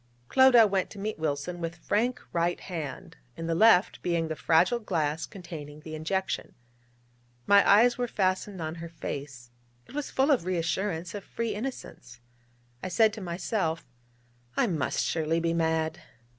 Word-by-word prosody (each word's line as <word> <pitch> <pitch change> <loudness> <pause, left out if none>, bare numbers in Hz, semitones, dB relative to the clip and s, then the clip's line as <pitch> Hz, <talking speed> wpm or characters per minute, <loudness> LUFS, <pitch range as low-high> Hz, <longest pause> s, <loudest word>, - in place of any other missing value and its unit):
Clodagh 245 -5 +6
went 190 -2 0
to - - -12
meet 210 -2 -4
Wilson 155 +3 -2
with 165 0 -3
frank 225 +8 0
right 170 +1 +1
hand, 160 -8 -6 0.2
in 165 - -5
the 165 - 0
left 200 +1 +4
being 170 -2 0
the 160 - -2
fragile 170 +10 +3
glass 160 -7 -1
containing 155 -5 -9
the 155 0 -9
injection. 190 +5 -2 0.9
My 200 0 +7
eyes 235 +5 +5
were 245 - 0
fastened 190 -1 -1
on 155 0 -3
her 170 - -6
face: 140 -6 -7 0.3
it - - -16
was 295 0 -3
full 270 +3 +2
of 265 - +3
reassurance, 175 0 -2
of 205 -2 -6
free 230 +1 -3
innocence. 205 - -7 0.6
I - - -4
said 220 +3 +3
to 220 - -7
myself: 170 -1 -2 0.7
'I - - +3
must - - 0
surely 160 0 0
be 165 0 0
mad!' 160 0 0
175 Hz, 155 wpm, -28 LUFS, 160-210 Hz, 0.9 s, My